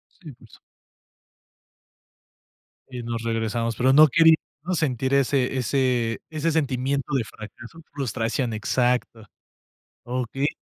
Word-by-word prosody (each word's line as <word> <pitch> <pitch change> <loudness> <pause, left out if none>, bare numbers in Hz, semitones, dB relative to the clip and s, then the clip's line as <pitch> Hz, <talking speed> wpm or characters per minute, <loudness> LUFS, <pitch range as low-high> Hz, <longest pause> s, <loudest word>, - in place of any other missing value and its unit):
Sí, 160 -7 -12
por 120 -1 -19
su - - -18 2.3
Y 125 -1 -6
nos 115 -1 -4
regresamos, 115 0 -2
pero 130 +3 +3
no 155 +2 +8
quería 160 +3 +6 0.3
uno 185 +1 -1
sentir, 130 -4 -1
ese 135 -1 +1
ese 125 -2 0
ese 160 +1 -1
sentimiento 140 -2 -1
de 130 -4 +1
fracaso 115 +8 -12
frustración, 125 -2 -2
exacto. 120 0 0 0.8
Okey. 125 +3 -2
125 Hz, 115 wpm, -24 LUFS, 115-140 Hz, 2.3 s, no